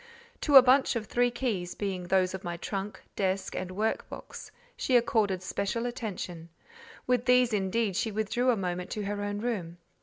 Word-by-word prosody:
To 290 - +2
a 265 - +12
bunch 260 +1 +4
of 225 -2 -2
three 245 +4 +2
keys, 225 -8 -3
being 190 -3 -3
those 185 0 +2
of 190 +1 -6
my 175 -1 -4
trunk, 195 +3 -4 0.2
desk, 190 0 -1
and 185 - -3
work 210 +4 -2
box, - - -9 0.3
she 255 - +3
accorded 210 -6 +1
special 200 +5 -2
attention: 185 -8 -5 0.6
with 250 -1 +1
these, 250 -2 +4
indeed, 200 0 0
she 220 - 0
withdrew 220 +4 0
a 240 - +3
moment 180 -1 -3
to 210 - -3
her 205 0 -3
own 205 0 -3
room. 190 -8 -3
205 Hz, 180 wpm, -29 LUFS, 185-240 Hz, 0.6 s, a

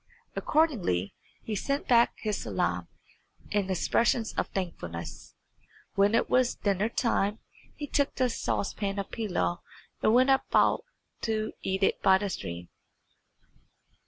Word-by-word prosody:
Accordingly 210 - +1 0.3
he 220 - -4
sent 275 +7 -2
back 235 -1 +5
his 210 -2 -2
salam 90 -4 -1 0.6
and 205 -2 0
expressions 225 +5 +1
of - - -1
thankfulness. 125 - -6 0.6
When 200 +2 +3
it - - +2
was 255 -1 +2
dinner 200 +1 0
time 215 -3 +1 0.4
he 295 - -5
took 285 0 0
the 255 - +2
saucepan 200 -3 -2
of 200 - -4
pilaw 195 -5 -1 0.4
and 215 - +4
went 255 +2 +5
out 270 - +3 0.4
to 220 -1 -1
eat 190 +1 -1
it - - +2
by 190 -1 +6
the 200 0 -3
stream. 85 - -6
205 Hz, 130 wpm, -29 LUFS, 190-235 Hz, 0.6 s, by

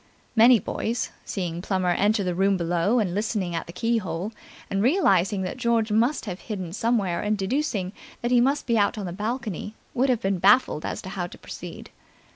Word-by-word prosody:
Many 235 +2 +7
boys, 225 +3 -3
seeing 175 -3 -3
Plummer 185 -2 0
enter 205 +3 +2
the 180 -1 -1
room 195 +2 +2
below 175 +6 +1
and 200 -7 +1
listening 205 -3 -1
at 165 - -3
the - - -7
keyhole 200 -3 -1 0.4
and 195 - -1
realizing 200 - +3
that 185 +7 -4
George 230 -3 +1
must 235 +7 +2
have 185 -3 -5
hidden 185 -7 -5
somewhere 210 -5 0
and 210 0 0
deducing 200 -3 -1 0.3
that 240 - 0
he 245 -1 +5
must 275 +4 +1
be 230 -2 +2
out 205 +3 +2
on 205 - -4
the 175 - -4
balcony, 215 -1 -4 0.2
would 260 +2 +2
have 245 -3 +2
been 195 -1 0
baffled 200 -4 +4
as - - -4
to 190 - -6
how 185 -3 -3
to - - -12
proceed. - - -9
205 Hz, 195 wpm, -25 LUFS, 185-235 Hz, 0.4 s, Many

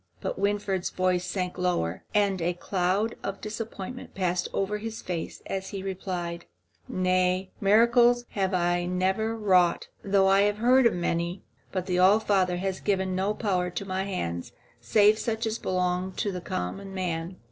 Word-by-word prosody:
But - - -4
Winfried's 200 -2 0
voice 185 -1 +1
sank 180 -1 -3
lower 95 - -1
and 200 -3 +2
a 175 +1 0
cloud 190 +5 0
of 195 0 -4
disappointment 225 +2 -6
passed 180 -2 0
over 205 +2 -1
his 225 +1 -5
face 175 -3 -5
as 190 0 -4
he 195 -2 -5
replied: 180 -3 -4 0.4
"Nay, 185 0 +1
miracles 235 +4 +5
have 195 -2 -1
I 175 -1 +1
never 190 +5 0
wrought, 185 -5 +3
though 195 -1 +3
I 195 +1 +5
have 205 0 +2
heard 250 +3 +5
of 230 - 0
many; 175 +1 -2 0.3
but 185 -2 -2
the 180 -1 0
All 195 +4 +6
Father 190 -4 +1
has 190 +1 -2
given 190 -2 0
no 195 +3 0
power 185 -5 0
to 180 +3 -5
my 190 0 -2
hands 85 - -4 0.3
save 210 - +4
such 225 0 -2
as 220 +1 -2
belongs 180 0 -1
to 190 -3 -3
common 190 - -4
man." 175 -1 -3
190 Hz, 160 wpm, -27 LUFS, 180-205 Hz, 0.4 s, All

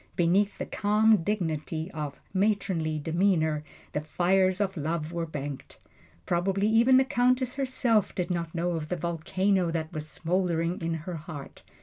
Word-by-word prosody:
Beneath 190 +4 +2
the - - -3
calm 215 +1 +3
dignity 165 -3 -2
of 150 -3 -5
matronly 190 -6 +1
demeanor 160 -1 +1 0.3
the 150 - -2
fires 185 +4 +2
of 195 -2 0
love 160 0 -2
were 170 -1 -2
banked. 145 -3 -6 0.5
Probably 195 +3 +1
even 235 +4 +5
the 265 - +4
Countess 250 0 +2
herself 255 -6 +1
did 180 0 -2
not 170 -1 -3
know 175 +1 0
of 160 -2 -3
the 180 - 0
volcano 180 +2 0
that 160 -1 -3
was 155 0 -5
smoldering 175 0 -1
in 165 0 -1
her 180 -2 -4
heart. 155 -3 -9
175 Hz, 150 wpm, -28 LUFS, 160-200 Hz, 0.5 s, even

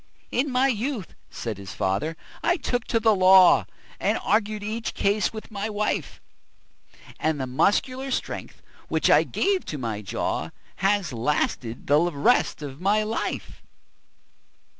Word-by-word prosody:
"In 275 +4 +1
my 255 +1 +3
youth," 235 -4 -2 0.2
said 110 -4 -5
his 100 -1 -8
fater, 100 +13 -1 0.2
"I 350 - +2
took 245 -5 -2
to 230 - +1
the 220 -1 +4
law, 185 -1 +6 0.3
And - - +1
argued 215 -1 +1
each 220 +2 -4
case 200 0 +1
with 220 0 -9
my 205 +1 -3
wife; 210 0 -2 1.0
And 155 -2 0
the 130 - -1
muscular 255 - +1
strength, 260 - -4 0.2
which - - +1
it - - +4
gave 390 -2 +1
to 150 - -5
my 115 -5 -3
jaw, 100 - -2 0.3
Has 195 -7 +1
lasted 120 -1 -1
the 145 +2 +4
rest 170 +1 +2
of 140 +2 -8
my 210 +3 +2
life." 220 +1 -4
200 Hz, 140 wpm, -25 LUFS, 145-225 Hz, 1.0 s, law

